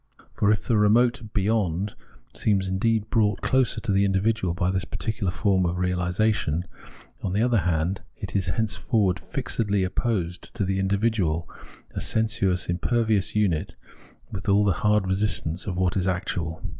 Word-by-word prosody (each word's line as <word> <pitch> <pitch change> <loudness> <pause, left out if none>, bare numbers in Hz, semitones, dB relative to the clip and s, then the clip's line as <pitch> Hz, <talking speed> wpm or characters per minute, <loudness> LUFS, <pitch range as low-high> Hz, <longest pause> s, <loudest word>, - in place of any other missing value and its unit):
For 105 - +2
if 110 - 0
the 115 - +1
remote 120 +4 +3
' 105 - -22
beyond 100 -2 0 0.2
' - - -27
seems 95 -3 +1
indeed 110 +3 0
brought 105 -3 +2
closer 130 -1 +1
to 115 - -1
the 100 0 +3
individual 95 -2 +1
by 90 0 0
this 95 -1 -1
particular 105 +1 -3
form 95 0 +1
of 90 0 -1
realisation, 90 -1 0 0.6
on 90 - -2
the 105 +3 +2
other 120 -2 +3
hand, 85 +2 0 0.2
it - - -7
is 95 -3 +1
henceforward 110 -3 0
fixedly 100 -3 -1
opposed 95 -2 -2
to 105 -4 0
the 95 0 -1
in 95 - 0
dividual, 100 -6 0 0.4
a - - -4
sensuous, 100 -5 +1
impervious 105 +3 0
unit, 95 -7 0 0.6
with 95 +1 -4
all 100 +1 +4
the 100 - +3
hard 105 -2 +3
resistance 95 -3 0
of 90 -3 -3
what 90 -1 +1
is 95 -1 0
actual. 85 -3 -2
100 Hz, 165 wpm, -25 LUFS, 90-110 Hz, 0.6 s, all